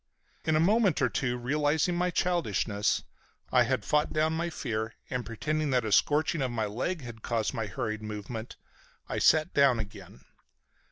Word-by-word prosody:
In 160 - +2
a - - +4
moment 200 0 +3
or 125 - +2
two, 125 -1 -1
realizing 150 +6 +1
my 180 +1 +1
childishness, 115 - 0 0.5
I - - +5
had - - -1
fought 150 0 +2
down 155 0 +1
my 170 +1 -1
fear 110 -8 -3 0.2
and, 125 -1 -1
pretending 150 +7 -2
that 125 -3 +1
a 110 - -2
scorching 155 - +3
of 130 - 0
my 115 -2 -1
leg 135 - -3
had 120 -2 -9
caused 115 -1 -1
my 115 -4 -2
hurried 110 +3 -3
movement, 110 +2 -6 0.5
I - - -2
sat 155 +3 +4
down 140 -4 +5
again. 100 -4 -8
130 Hz, 170 wpm, -29 LUFS, 110-155 Hz, 0.5 s, I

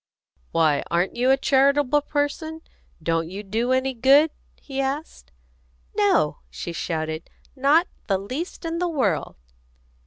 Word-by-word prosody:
"Why, 155 -3 +3
aren't 175 +2 0
you 250 +2 +2
a 270 - +5
charitable 280 +1 +3
person? 305 +2 -2 0.4
Don't 165 0 0
you 195 +3 -6
do 225 +5 -1
any 260 +1 +1
good?" 275 +6 +5 0.3
he 275 -1 -4
asked. 270 - -4 0.6
"No!" - - +2
she 170 - -6
shouted. 160 -1 -3 0.3
"Not 290 +6 +4 0.2
the 195 - +2
least 260 - -6
in 330 0 -2
the 355 0 0
world!" 220 - 0
265 Hz, 130 wpm, -24 LUFS, 180-290 Hz, 0.6 s, a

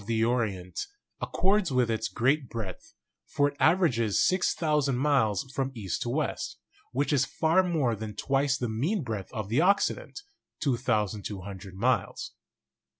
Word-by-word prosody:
the 115 -1 +2
Orient 105 -7 -1 0.3
accords 195 -3 +1
with 125 -3 +2
its 110 0 -1
great 130 +6 +1
breadth; 105 -6 -7 0.3
for 145 - +2
it 140 - -15
aver 180 +3 +5
ages 115 - +1
6,000 150 -7 +1
miles 130 -7 +2
from 135 0 -1
east 100 -6 -3
to - - -2
west, - - -2 0.3
which 145 +4 0
is 135 -2 +4
far 160 +7 +2
more 155 -10 +1
than 105 0 -6
twice 135 +3 +1
the 120 - -2
mean 145 - -1
breadth 110 -6 -5
of 110 -3 -4
the 120 +9 +2
Occident 200 - +1 0.4
(2,200 100 - -2
miles). 130 - 0
125 Hz, 145 wpm, -28 LUFS, 110-150 Hz, 0.4 s, aver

